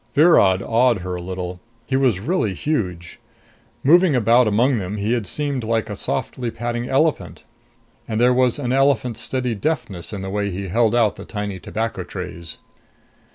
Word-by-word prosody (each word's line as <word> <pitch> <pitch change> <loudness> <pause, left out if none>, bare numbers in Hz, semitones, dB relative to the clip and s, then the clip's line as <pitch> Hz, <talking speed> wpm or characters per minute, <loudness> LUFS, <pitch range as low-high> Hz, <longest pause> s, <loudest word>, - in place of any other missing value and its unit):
Virod 100 - +5
awed 115 -3 +2
her 90 0 -4
a - - -6
little 90 0 -5 0.3
he 130 - -2
was 130 -8 +2
really 110 - -1
huge. 90 - -3 0.6
Moving 170 +1 +5
about 120 +1 +4
among 120 +4 +2
them, 100 +2 -4
he 105 +3 0
had 115 -5 -2
seemed 140 +1 -2
like 115 0 -1
a - - -4
softly 125 -2 -3
padding 120 +1 -4
elephant. 125 - 0 0.6
And 110 -1 -2
there 125 +1 +4
was 125 0 +2
an 125 -4 -2
elephant's 130 -4 +2
steady 125 -2 -2
deftness 105 - -3
in 100 -3 -5
the 95 - -5
way 100 0 -1
he 95 0 -5
held 115 +3 +2
out 115 -4 +2
the - - -8
tiny 105 -3 -5
tobacco 110 -3 -3
trays. 90 -3 -7
115 Hz, 170 wpm, -21 LUFS, 95-125 Hz, 0.6 s, Virod